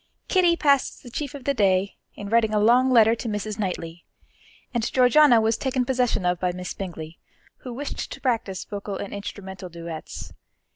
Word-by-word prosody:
Kitty 355 -3 +4
passed 280 -4 +2
their 245 - -11
chief 285 +2 -4
of 275 - -9
the 280 - +1
day 195 -4 +2 0.2
in 205 - -7
writing 220 0 +2
a - - +3
long 245 +5 +4
letter 225 -3 +6
to 235 +1 -5
Mrs. 210 0 -3
Knightley, 175 -4 -4 0.7
and 235 -2 -1
Georgiana 255 0 +6
was 220 +1 +1
taken 260 -2 0
possession 245 -6 0
of 180 -1 +1
by 180 -1 0
Miss 180 0 -6
Bingley, 165 -4 -7 0.4
who 255 - -9
wished 280 +4 -5
to - - -7
practice 225 -7 -1
vocal 200 -1 -5
and 200 - -6
instrumental 190 -2 -7
duets. 170 -1 -8
215 Hz, 180 wpm, -24 LUFS, 190-250 Hz, 0.7 s, letter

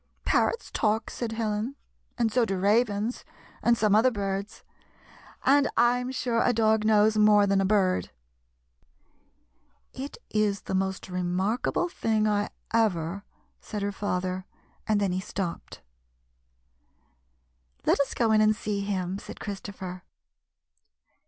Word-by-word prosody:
" - - -40
Parrots 470 - +1
talk," 220 +1 0
said 230 -2 -4
Helen, 220 +3 -2 0.4
"and 230 -2 +1
so 245 +2 +3
do 195 -4 -1
ravens, 210 +3 +1 0.4
and 235 0 +3
some 215 -2 +2
other 225 +5 +5
birds; 200 -2 -4 0.8
and 280 0 +4
I 240 +1 +4
'm 250 +1 -4
sure 240 -3 0
a 245 - +3
dog 220 -1 +2
knows 215 0 +4
more 210 -1 +6
than 195 -1 +2
a - - +1
bird." 190 -3 +2 1.0
" - - -42
It - - -14
is 210 -2 +1
the - - -6
most 190 0 -1
remarkable 185 - -1
thing 220 -9 0
I 205 -1 +1 0.2
ever 200 -4 0
— - - -39
" - - -45
said 210 -2 -5
her 205 - -1
father, 185 -2 -3 0.4
and 215 -2 +2
then 200 -2 +1
he 185 +1 -1
stopj^ed. 190 -3 -5 1.0
" - - -40
Let - - +3
us 280 - 0
go 230 -2 +2
in 215 0 +5
and 215 0 +4
see 210 -1 -3
him," 190 -1 -2
said - - -10
Christopher. 190 -3 -6
210 Hz, 145 wpm, -27 LUFS, 190-225 Hz, 1.0 s, more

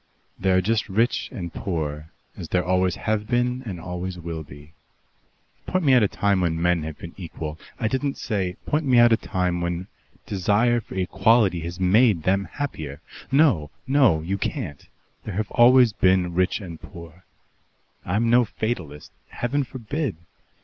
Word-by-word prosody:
There 95 0 +3
are - - +4
just 110 +3 0
rich 115 +5 +1
and 90 -9 -6
poor, 75 -4 -4 0.3
as - - -8
there 90 -2 +1
always 90 0 +1
have 105 -1 -2
been 125 +1 0
and 90 -4 -5
always 90 +1 -5
will 85 -2 -5
be. 75 +1 -13 0.9
Point 185 -1 0
me 135 - +5
out 125 - +6
a 105 - +4
time 100 -1 +1
when 80 -2 0
men 85 0 +2
have 75 -1 -6
been 85 - -9
equal 80 -4 -6
" - - -27
"I 110 - 0
didn't 135 +4 -1
say 95 -5 -2
" - - -38
"Point 150 +2 0
me 130 -2 +4
out 120 -1 +7
a - - +4
time 90 -3 -1
when 85 +1 -2 0.4
desire 105 +5 +2
for - - -11
equality 95 0 +3
has 85 +2 -6
made 95 -1 +4
them 95 +3 +1
happier. 80 - -5 0.3
No, 130 - +3 0.2
no. 130 - +4
You 95 +4 -2
can't. 70 -6 -4 0.4
There 105 -1 -4
always 125 0 +6
have - - -32
been 90 -2 +3
rich 90 +4 +1
and 85 -4 -9
poor. 85 +1 -12 0.8
I'm 105 +6 0
no 120 +2 +5
fatalist. 90 -10 -5 0.2
Heaven 140 +4 -1
forbid! 130 - -4
95 Hz, 170 wpm, -24 LUFS, 85-120 Hz, 0.9 s, out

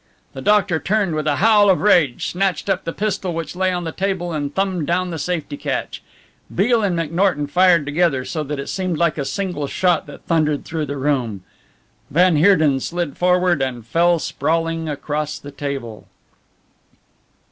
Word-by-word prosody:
The - - -7
doctor 205 -5 +2
turned 200 -2 0
with 155 0 -2
a 145 - +2
howl 205 +2 +5
of 185 - +4
rage, 170 -11 +3
snatched 190 0 -1
up 190 - -2
the 165 - -2
pistol 195 -3 -2
which 165 0 -5
lay 185 0 +1
on 175 -1 -2
the 165 - -4
table, 185 -1 -2
and 145 -2 -2
thumbed 185 -4 -1
down 180 +1 0
the 165 - -4
safety 160 -3 -3
catch. - - -4 0.5
Beale 225 +5 +3
and 190 -5 0
McNorton 165 -1 0
fired 175 0 +4
together, 145 -3 +1
so 155 - -3
that 145 +1 -4
it 140 - -4
seemed 185 -4 -2
like 170 -2 +1
a 140 - -2
single 180 -5 -3
shot 175 0 +1
that 145 - -12
thundered 155 -3 +1
through 160 -2 -3
the 140 +1 -4
room. 130 -8 -1 0.7
Van 180 +2 +4
Heerden 155 -5 +4
slid 170 0 -3
forward, 180 -3 +2
and 125 -4 -3
fell 170 +7 +3
sprawling 165 0 -1
across 150 +1 -3
the 145 - -10
table. 140 -6 -6
165 Hz, 175 wpm, -20 LUFS, 145-185 Hz, 0.7 s, howl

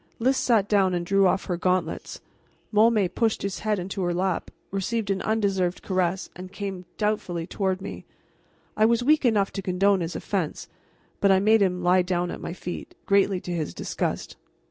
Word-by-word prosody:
Lys 260 +4 +2
sat 225 -6 +2
down 195 -3 +3
and 175 0 -2
drew 195 +1 +4
off 190 - +1
her 180 -3 -2
gauntlets. 180 -2 -1 0.5
Môme 215 -2 +4
pushed 225 -2 0
his 195 -1 -3
head 215 0 0
into 190 +1 -4
her 175 -1 0
lap, 185 -1 -1 0.2
received 200 +2 -1
an 195 -1 -1
undeserved 195 -4 0
caress, 185 -1 0
and 185 +1 -9
came 195 -2 -5
doubtfully 205 -6 -1
toward 190 +1 -1
me. - - -7 0.7
I 215 - +2
was 235 +2 +3
weak 300 +1 +3
enough 210 -4 +2
to 195 - -4
condone 195 +1 +2
his 170 0 -3
offense, - - -3 0.5
but 200 - +4
I 190 - +5
made 215 +2 +4
him 180 -2 +1
lie 180 +1 +5
down 180 -1 -1
at - - -7
my - - -5
feet, 175 -1 -7
greatly 200 -1 +3
to 180 - -6
his 160 -3 -3
disgust. - - -3
195 Hz, 185 wpm, -25 LUFS, 180-210 Hz, 0.7 s, I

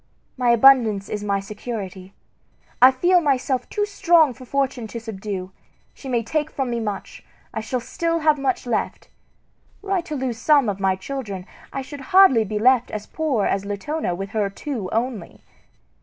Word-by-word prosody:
My 250 -2 +1
abundance 235 -4 +5
is 210 -1 -4
my 200 -1 0
security. 195 -2 -7 0.7
I 255 - +10
feel 350 +7 +3
myself 265 -3 0
too 415 -1 0
strong 340 -8 +3
for 255 +1 -13
Fortune 265 -3 -1
to 235 - -6
subdue. 195 -4 -6 0.4
She 270 - -10
may 240 -2 0
take 305 +6 -1
from 265 -5 -3
me 235 - -1
much; 210 -3 -5 0.3
I 220 - -3
shall 250 +3 -2
still 335 +7 -2
have 305 -1 +3
much 265 -2 -1
left. 240 - -3 0.7
Were 395 - -6
I 380 -2 +2
to 330 -3 -6
lose 255 -4 -3
some 285 -6 +4
of 200 -1 -3
my 190 -1 +2
children, 200 -3 -6 0.3
I 270 - -4
should 285 +1 -9
hardly 375 - +5
be 210 0 -4
left 245 +2 +3
as 210 -1 -5
poor 285 -10 -1
as 195 - 0
Latona 205 - -3
with 195 +2 -6
her 210 -3 0
two 210 -1 -5
only. 225 -5 -3
245 Hz, 175 wpm, -22 LUFS, 205-280 Hz, 0.7 s, I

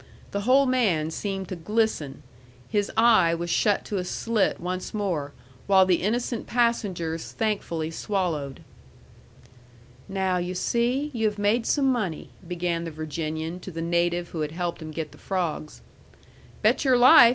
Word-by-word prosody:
The 200 - -2
whole 260 +6 +5
man 200 -12 +1
seemed 195 +1 -3
to 185 - -3
glisten. 170 -6 -1 0.4
His 205 -2 0
eye 220 -8 +5
was 170 0 -3
shut 205 +3 +2
to 205 - -2
a - - -2
slit 220 +3 0
once 180 +4 -4
more, 175 -9 -1 0.4
while 190 -1 +6
the 180 -2 +2
innocent 235 +3 -1
passengers 195 -9 0
thankfully 170 -7 -2
swallowed. 165 -8 -2 1.5
"Now, 190 -1 0
you 180 +1 -3
see, 245 +9 0
you 225 -2 +1
have 210 0 -3
made 210 +3 +1
some 285 -2 +2
money," 220 - -1 0.2
began 175 -1 -2
the 165 - -4
Virginian 155 +2 -4
to 185 - -8
the 165 -2 -5
native 170 +1 0
who 160 - -4
had 150 0 -3
helped 175 0 -3
him 155 - -6
get 155 -1 -5
the - - -16
frogs. 170 -5 -3 0.8
"Bet - - +3
your 260 -3 +4
life!" 245 -1 +9
185 Hz, 155 wpm, -26 LUFS, 165-220 Hz, 1.5 s, life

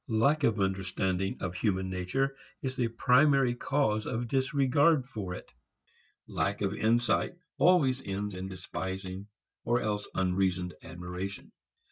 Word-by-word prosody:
Lack 140 +7 +3
of 115 -5 +2
understanding 95 0 0
of 90 -2 -2
human 95 -1 0
nature 135 +10 -1 0.3
is 130 -1 -2
the 125 -2 +1
primary 125 +2 +4
cause 120 -4 0
of 120 0 -2
disregard 135 +2 +3
for 100 -8 -5
it. - - -11 0.7
Lack 100 +1 -1
of 100 0 0
insight 120 +9 +1 0.2
always 135 -8 +4
ends 100 +1 -3
in 95 +1 -5
despising 95 +1 -5 0.4
or 120 +1 +2
else 105 -2 -2
unreasoned 90 -1 0
admiration. 90 +3 -6
105 Hz, 125 wpm, -30 LUFS, 95-130 Hz, 0.7 s, primary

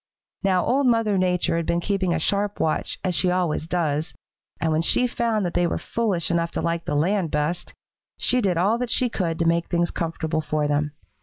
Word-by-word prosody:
Now 185 -2 +2
Old 270 +1 +2
Mother 225 -4 +2
Nature 180 -2 +1
had 170 - -2
been 170 - +1
keeping 190 -1 0
a 170 - +1
sharp 200 +5 0
watch, 155 - -1
as 185 -2 0
she 180 +2 +2
always 180 -3 0
does, 160 -3 -1 0.4
and 160 - 0
when 155 +1 +2
she 245 +8 +3
found 230 -4 0
that 175 - -2
they 175 - +2
were - - -1
foolish 200 -8 -1
enough 170 0 +1
to - - -2
like 170 0 -1
the 150 - -1
land 175 +3 +1
best, 150 +4 -2 0.4
she 250 - +2
did 185 -5 +1
all 205 +7 +2
that 250 -1 -2
she 245 +1 +1
could 170 -7 -2
to 165 - 0
make 170 0 +2
things 170 -1 0
comfortable 160 -1 -2
for 150 -1 -1
them. 145 0 0
175 Hz, 215 wpm, -24 LUFS, 165-200 Hz, 0.4 s, she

